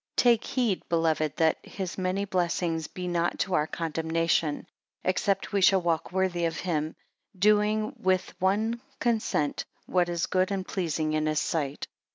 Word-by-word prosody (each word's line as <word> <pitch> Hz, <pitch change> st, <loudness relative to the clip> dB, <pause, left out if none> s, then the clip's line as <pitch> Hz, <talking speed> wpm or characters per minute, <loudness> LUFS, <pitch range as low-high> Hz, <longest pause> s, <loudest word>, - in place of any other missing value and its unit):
TAKE 235 Hz, -2 st, +4 dB
heed, 240 Hz, -8 st, -1 dB
beloved, 160 Hz, -2 st, +1 dB
that 160 Hz, -1 st, +2 dB
his 190 Hz, -3 st, -5 dB
many 185 Hz, +2 st, -1 dB
blessings 170 Hz, -3 st, 0 dB
be 180 Hz, -1 st, -6 dB
not 175 Hz, -1 st, 0 dB
to 190 Hz, -, -1 dB
our 150 Hz, -3 st, +2 dB
condemnation; 165 Hz, -1 st, 0 dB, 0.4 s
except 195 Hz, +2 st, 0 dB
we 200 Hz, -, +2 dB
shall 190 Hz, 0 st, +5 dB
walk 170 Hz, -1 st, 0 dB
worthy 180 Hz, -2 st, +1 dB
of 165 Hz, -1 st, -1 dB
him, 155 Hz, -3 st, -1 dB, 0.4 s
doing 210 Hz, +2 st, +3 dB
with 185 Hz, 0 st, +1 dB
one 215 Hz, +5 st, +1 dB, 0.2 s
consent 220 Hz, -, 0 dB, 0.2 s
what 180 Hz, -1 st, +1 dB
is 170 Hz, -1 st, 0 dB
good 185 Hz, 0 st, +1 dB
and 195 Hz, -2 st, -3 dB
pleasing 160 Hz, -4 st, -1 dB
in 155 Hz, 0 st, +1 dB
his 155 Hz, 0 st, +1 dB
sight. 145 Hz, -4 st, -2 dB
180 Hz, 155 wpm, -28 LUFS, 160-195 Hz, 0.4 s, shall